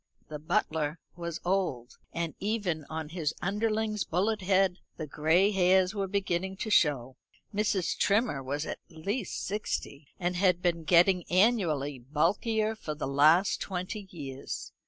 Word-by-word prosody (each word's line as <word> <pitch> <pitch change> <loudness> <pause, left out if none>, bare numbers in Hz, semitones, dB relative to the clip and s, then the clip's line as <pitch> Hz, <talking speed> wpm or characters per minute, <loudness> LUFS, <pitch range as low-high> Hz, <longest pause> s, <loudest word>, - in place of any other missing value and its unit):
The 150 -1 -6
butler 160 -2 -1 0.2
was 170 -1 -5
old, 175 -10 -1
and 170 -1 -3
even 195 -7 -1
on 160 -1 -4
his 160 -3 -2
underling's 215 +1 0
bullet 205 +5 0
head 190 -1 +2 0.2
the 155 - -4
gray 160 +7 +3
hairs 185 0 +3
were 200 -2 -2
beginning 190 -1 -1
to 220 - -4
show. 135 -8 +2 0.4
Mrs. 205 -3 0
Trimmer 205 - +2
was 145 +4 -3
at - - -5
least 195 +6 -4
sixty, 170 -7 -4
and 180 0 -1
had 180 -1 +3
been 170 -2 -1
getting 180 +2 +5
annually 175 - +2
bulkier 200 - 0
for 155 -8 -5
the 150 - -4
last 155 +8 +4
twenty 190 +2 -4
years. 140 -6 -7
180 Hz, 140 wpm, -29 LUFS, 155-200 Hz, 0.4 s, getting